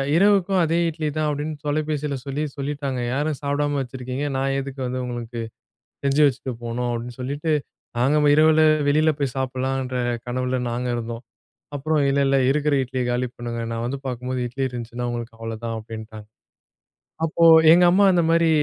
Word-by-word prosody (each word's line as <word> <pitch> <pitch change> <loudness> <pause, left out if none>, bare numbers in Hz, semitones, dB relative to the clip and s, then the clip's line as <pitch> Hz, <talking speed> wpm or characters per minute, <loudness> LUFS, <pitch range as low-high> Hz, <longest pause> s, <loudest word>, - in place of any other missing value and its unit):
"இரவுக்கும் 195 0 +4
அதே 165 +1 +1
இட்லி 155 -1 -3
தான்." 155 0 +1
அப்படின்னு 150 +1 -3
தொலைபேசியில 150 -1 -1
சொல்லி 140 +2 -2
சொல்லிட்டாங்க. 140 -2 -3
"யாரும் 145 +1 -1
சாப்பிடாம 145 0 0
வச்சிருக்கீங்க 130 +2 -5
நான் 135 0 0
எதுக்கு 135 0 -6
வந்து 130 +1 -3
உங்களுக்கு 120 -1 -5 0.6
செஞ்சு 140 +2 +2
வச்சுட்டு 130 -1 -3
போணும்." 120 +1 -2
அப்படின்னு 120 +1 -5
சொல்லிட்டு 145 +4 -1 0.5
நாங்க 135 +5 +3 0.2
இரவில 155 +1 +5 0.3
வெளியில 155 +2 +3
போய் 135 -4 -1
சாப்பிடலாம்ன்ற 130 0 -2 0.3
கனவுல 125 +1 -1
நாங்க 125 +1 -2
இருந்தோம். 115 0 -5 0.5
அப்புறம் 150 +2 0
"இல்லை 140 0 +2
இல்லை 135 0 +3
இருக்கிற 150 +1 +1
இட்லியை 130 0 -3
காலி 125 +1 0
பண்ணுங்க. 120 -1 -4
நான் 115 0 -3
வந்து 135 +3 -3
பார்க்கும்போது 125 0 -3
இட்லி 135 +3 -3
இருந்துச்சுன்னா 120 0 -5
உங்களுக்கு 120 -1 -6
அவ்வளவுதான்." 115 0 -5
அப்படின்ட்டாங்க. 110 -1 -9 1.0
அப்போ 165 +1 +1 0.3
எங்க 175 +1 +6
அம்மா 200 +2 +5
அந்த 175 -2 +3
மாதிரி 165 0 +4
135 Hz, 155 wpm, -23 LUFS, 120-150 Hz, 1.0 s, எங்க